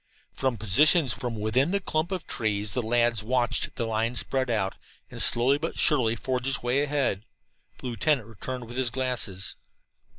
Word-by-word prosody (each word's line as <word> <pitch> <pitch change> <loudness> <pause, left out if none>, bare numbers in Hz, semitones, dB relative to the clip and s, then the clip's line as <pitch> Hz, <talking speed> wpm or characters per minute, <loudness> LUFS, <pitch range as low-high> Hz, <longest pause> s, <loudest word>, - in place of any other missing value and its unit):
From 130 -3 -1
positions 140 - +4
within 120 +3 0
the 200 +2 0
clump 160 -1 -2
of 185 -3 -4
trees 105 -2 -1
the 125 - 0
lads 120 -1 +2
watched 120 +2 0
the 115 - -2
line 115 +2 -1
spread 130 +1 +1
out 100 -4 0 0.4
and - - -2
slowly 130 +4 +4
but 165 +2 -4
surely 125 -7 +3
forge 125 +2 -3
its 135 -2 -1
way 125 +3 +1
ahead. 140 -8 -1 0.5
The - - -12
lieutenant 125 +1 0
returned 120 +3 -7
with 120 +2 -9
his 130 -2 +2
glasses. 125 -7 -2
125 Hz, 165 wpm, -26 LUFS, 110-135 Hz, 0.5 s, positions